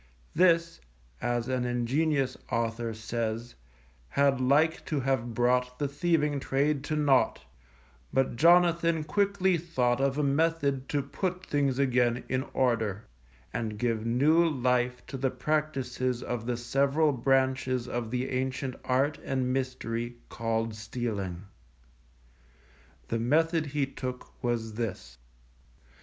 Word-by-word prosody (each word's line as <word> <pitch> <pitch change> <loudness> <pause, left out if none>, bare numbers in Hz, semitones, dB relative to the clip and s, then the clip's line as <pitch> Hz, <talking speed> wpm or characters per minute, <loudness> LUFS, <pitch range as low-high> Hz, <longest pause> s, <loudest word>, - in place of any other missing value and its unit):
This 170 -1 +3 0.4
(as 120 0 -1
an 130 -1 0
ingenious 130 +4 0 0.2
author 115 0 -1
says) 115 +1 -3 0.6
had 140 - +2
like 150 +5 +3
to 150 -3 -1
have 120 -3 -1
brought 125 +1 +1
the 145 - 0
thieving 150 0 +1
trade 140 +1 0
to 155 - -1
naught; 145 -4 +2 0.7
but 135 -2 +1
Jonathan 170 +1 +4
quickly 190 +2 +1
thought 130 -7 0
of 135 0 +1
a 150 - +1
method 140 -2 +1
to 145 -2 0
put 185 +6 -3
things 140 -3 0
again 125 -3 +2
in 130 0 +1
order, 110 -5 0 0.5
and 110 -2 -3
give 115 -1 0
new 140 +9 +4
life 125 -5 0
to 135 - -6
the 135 0 +1
practices 130 -5 -1
of 120 -1 -4
the 120 -1 -1
several 140 +5 +2
branches 130 -1 +1
of 120 -2 -3
the 125 +2 -2
ancient 130 0 -2
art 140 +3 +1
and 130 -1 -1
mystery 120 -2 -3
called 115 -1 -1
stealing. 105 -5 -4 1.7
The 115 - 0
method 160 +6 +2
he 145 0 0
took 130 -2 -7
was 115 -2 -1
this. 100 - -5
130 Hz, 125 wpm, -29 LUFS, 120-145 Hz, 1.7 s, Jonathan